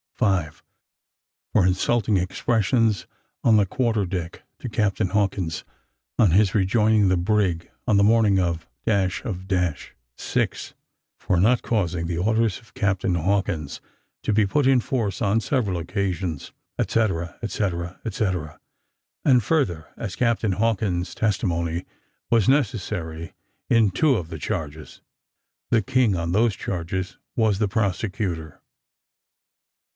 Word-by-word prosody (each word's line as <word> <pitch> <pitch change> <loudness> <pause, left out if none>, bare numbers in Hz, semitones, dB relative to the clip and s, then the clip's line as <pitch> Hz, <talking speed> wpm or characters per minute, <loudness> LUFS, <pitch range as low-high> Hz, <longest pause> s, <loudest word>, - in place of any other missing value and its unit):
5. 90 -9 0 0.9
For 95 - +4
insulting 100 +3 +2
expressions 110 +3 +1 0.4
on 110 -2 +5
the 105 - +4
quarter 115 -2 0
deck 85 -2 -5 0.2
to 125 - -5
Captain 105 -3 0
Hawkins, 95 -6 -1 0.5
on 105 -7 +5
his 95 +2 +4
rejoining 105 +1 +3
the 95 - +3
brig 90 -3 0 0.2
on 110 -5 +4
the 100 - +5
morning 105 -2 +4
of 85 -3 -1 0.2
the 95 -4 +1
of. 90 -5 -2 0.3
6. - - -2 0.4
For 90 - 0
not 115 +7 +4
causing 90 -7 -1
the 85 0 -2
orders 110 +1 +1
of 115 - -23
Captain 100 -2 0
Hawkins 85 -4 -1 0.4
to - - 0
be 105 0 +4
put 140 +8 +1
in 135 -1 +5
force 115 -5 -2
on 105 +2 +2
several 110 - 0
occasions, 90 -2 -3 0.3
etcetera, 95 -7 0
etcetera, 90 -5 -2
etc. 95 -8 -2 0.7
And 125 -5 +5
further, 95 - 0
as 100 -4 -5
Captain 115 -4 +1
Hawkins' 95 -4 0
testimony 85 -5 -1 0.4
was 115 -3 +3
necessary 95 - -1 0.4
in 115 -3 +4
two 135 +9 +3
of 85 -7 -3
the 80 -2 -7
charges, 80 -6 -5 0.7
the 115 - +3
King, 125 -3 +2
on 85 -1 -2
those 110 +2 +2
charges, 95 +1 -4 0.2
was 110 -4 +2
the 105 - +2
prosecutor. 95 -6 -2
100 Hz, 125 wpm, -24 LUFS, 90-110 Hz, 0.9 s, on